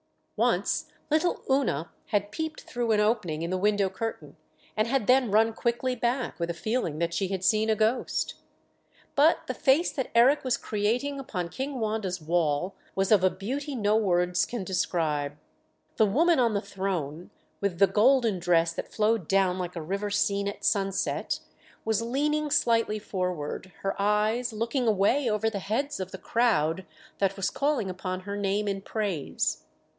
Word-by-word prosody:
Once - - +1 0.2
little 320 +3 +1
Oona 265 - +1 0.2
had 205 0 0
peeped 315 +6 -4
through 240 -2 -2
an 215 - +3
opening 210 -8 0
in 170 - -3
the 185 - 0
window 205 0 +2
curtain, 225 +4 -5 0.4
and 215 +1 +1
had 265 -2 +1
then 255 0 +4
run 220 +2 +3
quickly 240 +3 -1
back, 245 -1 -1
with 170 0 -1
a 170 - -2
feeling 215 -5 -2
that 170 +1 -1
she 190 +3 0
had 190 -1 -3
seen 215 +3 +3
a 220 - +3
ghost. 220 +4 0 0.8
But 300 +4 +4
the - - -3
face 290 +6 +3
that 265 - -3
Eric 255 +5 +5
was 255 -2 +1
creating 240 +7 -1
upon 180 -10 -4
King 265 +5 -4
Wanda's 215 -5 -2
wall 165 +2 0 0.2
was 195 +1 0
of 205 -4 +5
a 185 - +6
beauty 265 - -4
no 210 -2 +2
words 180 -4 +2
can 240 -5 -4
describe. 155 -6 -1 0.6
The 220 - +5
woman 320 - +3
on 230 -4 +2
the 200 - +1
throne, 185 -6 -4 0.3
with 200 -4 -1
the 195 - +7
golden 220 +1 +3
dress 170 -1 +2
that - - -6
flowed 215 -5 +1
down 190 -1 +2
like 180 0 -4
a 170 - -4
river 200 +5 -2
seen 200 0 +1
at 200 - -5
sunset, 195 -1 0 0.4
was 220 0 +1
leaning 295 +5 0
slightly 230 -6 +2
forward, 180 -3 -4
her 195 0 -2
eyes 215 +4 +1
looking 230 +3 -1
away 220 +6 +3
over 220 +1 +1
the 200 - -3
heads 235 +9 -2
of 185 -1 -4
the - - -7
crowd 190 -7 +1 0.3
that 195 -1 +1
was 195 - 0
calling 275 -9 0
upon 185 0 -4
her 200 +2 -5
name 205 +1 0
in 195 -1 -2
praise. 195 - -2
205 Hz, 170 wpm, -27 LUFS, 185-235 Hz, 0.8 s, the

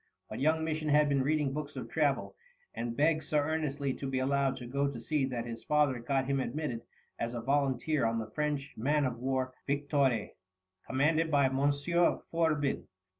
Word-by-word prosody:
But - - -5
young 160 +3 +2
Misson 155 -1 -1
had 150 0 +5
been 140 -1 +2
reading 145 0 +1
books 150 0 -5
of - - -5
travel, - - 0 0.4
and 115 0 -4
begged 155 +1 +3
so 150 +1 0
earnestly 145 -2 0
to 135 - -5
be 135 - -1
allowed 135 +1 +1
to 125 - -7
go 140 +3 0
to 130 -4 -6
sea 140 +4 0
that 120 -3 -3
his 115 -1 -7
father 150 -4 +2
got 135 +2 0
him 135 0 0
admitted 130 -2 -3 0.4
as 115 +1 -2
a - - -2
volunteer 140 +2 +1
on 115 0 0
the 110 -1 -4
French 145 -1 -2
man 145 +5 +1
of 120 -2 -2
war 130 0 -1
Victoire, 140 -5 +1 0.6
commanded 155 +5 +2
by 140 -3 +4
Monsieur 145 +6 +2
Fourbin. 155 -4 +1
140 Hz, 180 wpm, -31 LUFS, 130-150 Hz, 0.6 s, had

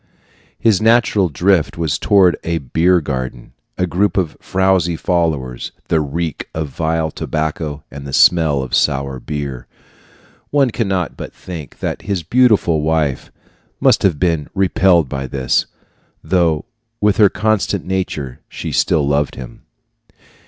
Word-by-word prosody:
His 110 -4 +2
natural 110 -4 +3
drift 85 +2 +1
was 80 -3 -1
toward 95 -4 +4
a 85 0 -1
beer 85 +5 +2
garden, 65 -4 -5 0.2
a 90 - +1
group 90 +5 0
of 90 -5 0
frowsy 95 -3 +1
followers, 80 -9 -1 0.2
the 80 - +3
reek 80 +1 -3
of 80 -2 -3
vile 80 +1 -1
tobacco, 75 -1 -3
and 70 0 -8
the - - -6
smell 75 -2 +4
of 65 - -8
sour 70 -1 +1
beer. 70 -3 -5 0.8
One 140 -4 +2
cannot 95 -7 -1
but - - -8
think 85 -6 -9
that - - -3
his 95 -4 -3
beautiful 105 -6 +3
wife 75 -3 -1 0.5
must - - +4
have 90 -6 +2
been 80 -3 0
repelled 95 -4 +3
by 65 +1 -4
this, 65 0 0 0.6
though 80 -2 +1 0.3
with 105 -1 +2
her 105 -2 +6
constant 105 -3 0
nature 85 -9 -3
she - - -6
still 75 -3 +2
loved 70 0 0
him. 65 -2 -10
80 Hz, 140 wpm, -18 LUFS, 70-95 Hz, 0.8 s, her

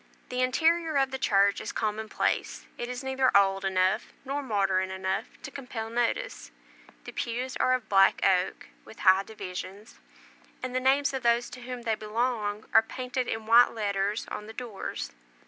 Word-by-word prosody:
The 250 0 -1
interior 320 +4 +2
of 270 0 +2
the 265 - -4
church 200 -4 +3
is - - -4
commonplace; 215 0 -2
it 240 - -5
is 250 +1 -5
neither 265 0 +2
old 195 -1 +3
enough 190 +3 +1 0.2
nor 280 +2 -2
modern 195 -6 +1
enough 190 +4 -2 0.2
to 275 - -7
compel 240 -5 -6
notice. 240 - -1 0.5
The - - -8
pews 250 +2 -3
are 255 - +3
of 245 -4 -5
black 195 -1 +5
oak, 185 -2 +1
with 225 - -13
high 190 0 +6
divisions; 195 0 -8 0.6
and 255 -1 -3
the - - +3
names 275 +2 +2
of 265 - -2
those 235 0 +2
to 250 0 -9
whom 245 0 -6
they 225 -1 +1
belong 215 -1 -2
are 225 - +8
painted 250 +2 -4
in 225 0 -3
white 235 +2 +6
letters 205 -1 -1
on 210 - -5
the 220 - -9
doors. 225 -5 -5
230 Hz, 170 wpm, -28 LUFS, 200-255 Hz, 0.6 s, are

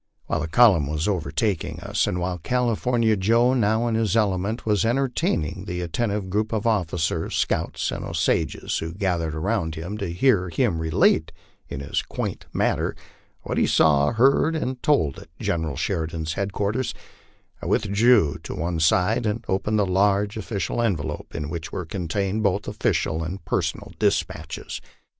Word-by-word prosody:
While - - -1
the 80 - -2
column 90 - +5
was 75 +3 -1
overtaking 95 +1 -1
us, - - 0
and 90 - -1
while 90 0 -2
California 120 +2 +1
Joe, 115 +6 +3
now 110 -1 +2
in 115 - 0
his 110 -1 +1
element, 105 +1 0
was 105 -1 +2
entertaining 125 - 0
the 90 0 -3
attentive 100 +3 -2
group 105 +3 -1
of 110 0 -1
officers, 85 -7 0
scouts, - - 0
and - - -4
Osages 80 -4 0
who 80 +1 -5
gathered 85 -6 -1
around 80 -1 -1
him 90 +7 -5
to 100 -5 -3
hear 90 -1 +2
him 80 0 0
relate 80 0 +2 0.4
in 70 - -5
his 70 - -1
quaint - - -5
manner - - 0 0.5
what - - -1
he - - +3
saw, 75 -2 +4
heard, 135 +7 +3
and 130 -5 -3
told 80 - +2
at - - -13
General 80 -4 -1
Sheridan's 80 +2 -2
headquarters, 100 +5 -2 0.7
I - - -5
withdrew 105 - +3
to - - -6
one 85 +1 -2
side 90 +7 +3
and 110 +2 -2
opened 100 +3 0
the 105 - +3
large 100 +2 +2
official 110 +1 -2
envelope 80 -10 -2
in 75 - -3
which 80 0 -5
were 90 - -4
contained 95 +4 -2
both 100 -1 0
offi - - 0
cial 80 +1 0
and 85 +2 -6
personal - - -2
despatches. - - -1
95 Hz, 160 wpm, -24 LUFS, 80-110 Hz, 0.7 s, column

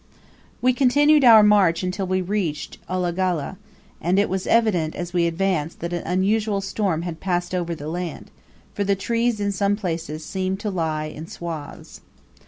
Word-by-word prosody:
We 255 0 +4
continued 290 +3 +4
our 225 -3 +9
march 200 -5 +4
until 185 +1 -2
we 185 0 0
reached 180 -6 -3
Ulagalla, 180 -2 -1 0.4
and 180 +3 +1
it 200 - +2
was 190 0 -2
evident, 195 -9 +2
as 175 0 -5
we 170 -1 +2
advanced, 170 -2 -1
that 170 +1 -3
an 175 - -2
unusual 200 +3 +1
storm 195 -4 -1
had 170 -2 -5
passed 175 -1 -2
over 175 -2 -1
the 150 -1 -8
land, 175 +1 -5 0.4
for 205 - -1
the 200 0 +2
trees 230 +3 0
in 200 0 0
some 200 +1 +1
places 165 -5 -4
seemed 190 +1 -2
to 210 - -2
lie 160 -4 -1
in 155 +1 -8
swathes. 165 -5 -8
185 Hz, 170 wpm, -23 LUFS, 170-205 Hz, 0.4 s, our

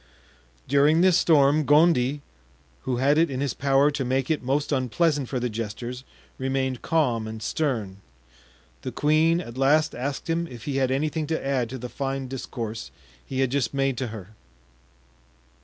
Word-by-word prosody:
During 145 +4 +4
this 185 -1 +5
storm, 155 -3 +4
Gondy, 145 -2 +3 0.6
who 125 -2 -1
had 140 +4 +3
it 165 - +3
in 130 -2 -4
his 140 -3 -1
power 140 +1 +3
to 145 -2 -2
make 130 +2 0
it 155 - 0
most 140 +4 -1
unpleasant 140 +1 +1
for 130 - -2
the 125 - -1
jesters, 115 +3 -5 0.4
remained 130 -1 -1
calm 125 -9 0
and 110 0 -6
stern. 110 -6 -2 0.8
The - - -5
queen 155 +3 +2
at 125 -5 -9
last 150 +4 +3
asked 135 +3 -4
him 170 +1 -1
if 120 -7 -10
he 140 -2 -2
had 130 -1 +2
anything 150 +3 -1
to 160 -2 -2
add 130 -4 0
to 130 - -5
the 125 0 -6
fine 135 0 -4
discourse 115 -4 -6 0.3
he 130 0 -3
had 130 -2 +1
just 140 -1 -1
made 135 -1 +1
to 130 - -2
her. 105 -4 -8
135 Hz, 170 wpm, -25 LUFS, 125-150 Hz, 0.8 s, this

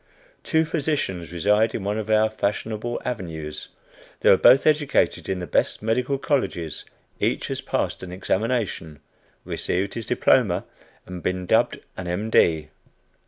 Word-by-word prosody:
Two 160 0 +1
physicians 145 - -2
reside 105 +6 +2
in 100 - -3
one 105 +2 -1
of 110 0 -5
our 110 0 +4
fashionable 110 +2 -3
avenues. 80 -10 -5 0.5
They - - +6
were - - +8
both 135 - +6
educated 150 -2 +2
in 95 - 0
the 90 - -4
best - - 0
medical 125 +5 0
colleges; 130 - -2 0.3
each - - 0
has - - 0
passed - - -2
an 95 - -7
examination, 95 -4 -2 0.5
received 95 +3 -2
his 115 -3 -5
diploma, - - +2 0.4
and 90 -1 -7
been 90 +2 -2
dubbed - - +2 0.2
an 95 - -5
M. 100 +6 -3
D. 80 -6 +3
105 Hz, 145 wpm, -24 LUFS, 90-120 Hz, 0.5 s, were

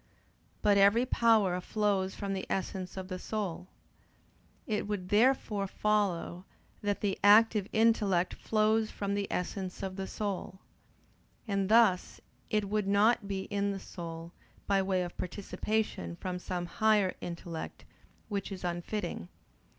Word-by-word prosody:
But 205 -1 +5
every 205 +5 +5
power 215 -7 +3
flows 200 -1 0
from 200 -1 -3
the 190 - -4
essence 190 -1 -3
of 190 -1 -5
the 185 -1 -5
soul. 185 -5 -4 1.0
It 210 -2 -2
would 195 -3 -3
therefore 210 -3 +2
follow 190 -4 0 0.4
that 205 -1 -1
the 200 -2 -1
active 210 0 +6
intellect 210 -5 +3
flows 215 0 +1
from 200 0 -3
the 200 -1 -1
essence 185 +1 -3
of 190 0 -4
the 190 0 -3
soul. 200 -3 -4 0.9
And 195 -2 0
thus 220 -5 +4 0.3
it 210 -1 +1
would 210 0 0
not 205 +2 +3
be 195 -1 -2
in 200 0 0
the 195 -1 -3
soul 165 -2 -8 0.3
by 195 -1 +2
way 190 -1 +1
of 175 - -8
participation 195 - -2
from 180 - -4
some 180 -1 -3
higher 210 0 +2
intellect: 170 -1 -6 0.4
which 200 -1 -3
is 190 -2 -7
unfitting. 175 - -3
200 Hz, 135 wpm, -31 LUFS, 185-210 Hz, 1.0 s, active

